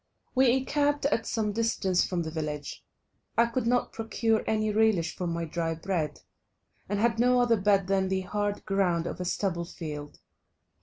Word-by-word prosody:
We 260 -2 +5
encamped 285 +2 +1
at 230 -5 +1
some 215 -2 0
distance 205 -4 +1
from 175 -2 -1
the 160 - -5
village; 150 -2 -5 0.5
I 235 - +6
could 235 0 -2
not 245 +1 +1
procure 225 0 0
any 215 -1 +1
relish 210 -6 +2
for 180 - -3
my 170 0 -2
dry 165 0 -2
bread, 160 -3 -2 0.7
and 205 - 0
had 230 +1 +2
no 250 +1 +4
other 235 -4 +3
bed 200 -1 +3
than 190 0 +1
the 190 0 0
hard 205 +2 -2
ground 180 -4 +1
of 180 - -4
a - - -3
stubble 175 -2 -1
field. 150 -4 -7
200 Hz, 170 wpm, -28 LUFS, 170-230 Hz, 0.7 s, I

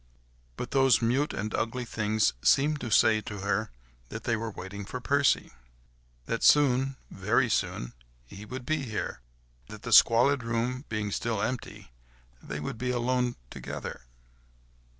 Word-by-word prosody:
But 125 - -5
those 135 -4 +4
mute 130 +6 +1
and 105 +2 -4
ugly 120 +2 -2
things 110 - +1
seemed 145 +2 +3
to 120 - -4
say 110 0 +4
to 105 -2 -7
her 100 +2 -1 0.4
that - - -7
they 115 - +1
were 115 +1 -3
waiting 100 0 -7
for 125 +6 -6
Percy; 140 +2 +2 0.7
that - - -2
soon, 135 -2 +4 0.2
very 110 +7 +1
soon, - - -1 0.3
he 95 +11 -11
would 125 +3 -7
be 155 +1 0
here, 110 -6 -4 0.5
that 105 - -11
the 115 - -1
squalid 120 +5 +6
room 120 +3 -2
being 110 -2 -2
still 115 +1 -1
empty, 125 - -4 0.5
they 75 - -6
would 75 +9 -5
be 125 - -2
alone 125 0 0 0.2
together. - - -7
115 Hz, 150 wpm, -28 LUFS, 105-130 Hz, 0.7 s, squalid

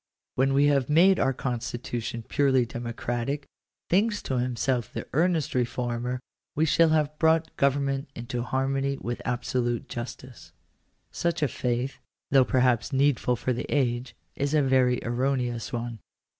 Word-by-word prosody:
When 135 +1 +2
we 140 +1 +5
have 140 -2 +2
made 175 +5 +5
our 135 - +3
constitution 120 -2 -4
purely 130 -3 +3
democratic, 120 +4 -3 0.4
thinks 205 +3 +2
to 130 -2 -1
himself 125 0 -1
the - - -5
earnest 165 0 +1
reformer, 125 0 -1 0.4
we 155 - +3
shall 165 +1 +4
have 150 -1 +1
brought 160 0 +2
government 140 0 +1
into 120 +1 -4
harmony 135 +2 -1
with 120 -1 -4
absolute 120 -1 -1
justice. 120 -6 -8 0.6
Such 170 -2 -1
a - - +4
faith, 125 +2 -2 0.3
though 135 -2 +6
perhaps 125 -2 +2
needful 135 -2 +2
for 125 +2 -1
the 120 - -4
age, 125 -3 0 0.2
is 140 +2 0
a 150 - +4
very 130 -2 +3
erroneous 120 -1 -1
one. 120 -1 -4
130 Hz, 140 wpm, -27 LUFS, 120-140 Hz, 0.6 s, though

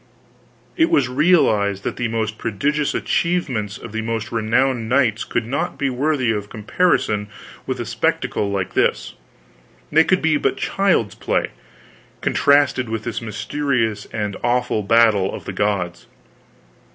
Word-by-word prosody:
It 325 0 +3
was 130 -3 +2
realized 120 - +2
that - - -3
the 120 - -1
most 110 -1 -3
prodigious 145 +7 -1
achievements 130 - -1
of - - -10
the 110 +1 -3
most 115 -1 -3
renowned 115 +1 +1
knights 120 -4 +2
could 120 - -2
not 140 +9 -3
be 140 -2 0
worthy 130 -2 +1
of 105 -1 -3
comparison 105 - 0 0.4
with - - -3
a - - -3
spectacle 100 - -1
like 95 -2 -2
this; - - 0 0.8
they 160 +2 +6
could 185 +1 +1
be 160 -2 +3
but - - 0
child's 185 - +1
play, - - -1 0.7
contrasted 140 -4 +2
with 110 -1 -3
this 120 0 -4
mysterious 115 -1 -2
and 105 -3 -3
awful 120 -2 +1
battle 105 -2 +3
of - - -8
the 95 - -5
gods. 90 -3 -2
115 Hz, 140 wpm, -20 LUFS, 105-140 Hz, 0.8 s, they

